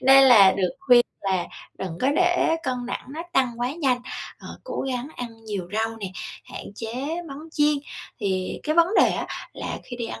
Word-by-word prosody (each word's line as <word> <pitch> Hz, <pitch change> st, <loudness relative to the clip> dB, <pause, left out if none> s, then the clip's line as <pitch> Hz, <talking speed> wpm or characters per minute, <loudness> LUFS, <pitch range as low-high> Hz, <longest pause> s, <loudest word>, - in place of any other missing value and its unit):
nên 270 Hz, +1 st, +8 dB
là 210 Hz, -7 st, +8 dB
được 190 Hz, -1 st, +1 dB
khuyên 245 Hz, -3 st, +6 dB, 0.2 s
là 190 Hz, -3 st, 0 dB, 0.3 s
đừng 175 Hz, -3 st, -5 dB
có 260 Hz, -, +3 dB
để 355 Hz, -2 st, +3 dB
cân 250 Hz, -3 st, -2 dB
nặng -, -, -4 dB
nó 310 Hz, +5 st, -5 dB
tăng 245 Hz, -5 st, +1 dB
quá 250 Hz, +3 st, 0 dB
nhanh, 270 Hz, -6 st, +1 dB, 0.4 s
ờ, -, -, -12 dB, 0.2 s
cố -, -, -4 dB
gắng 250 Hz, +1 st, -3 dB
ăn 230 Hz, -2 st, -7 dB
nhiều 200 Hz, -5 st, -4 dB
rau 225 Hz, +1 st, -1 dB
nè, 205 Hz, -3 st, -5 dB, 0.4 s
hạn -, -, -8 dB
chế 225 Hz, +1 st, -6 dB, 0.3 s
món 275 Hz, -, -7 dB
chiên, 300 Hz, -1 st, +3 dB, 0.5 s
thì 190 Hz, -3 st, -1 dB
cái 310 Hz, 0 st, 0 dB
vấn 335 Hz, 0 st, +5 dB
đề -, -, +5 dB
á -, -, -2 dB, 0.3 s
là -, -, -5 dB
khi 245 Hz, -, -7 dB
đi 235 Hz, -2 st, -3 dB
ăn 110 Hz, -, -6 dB
245 Hz, 200 wpm, -24 LUFS, 210-275 Hz, 0.5 s, nên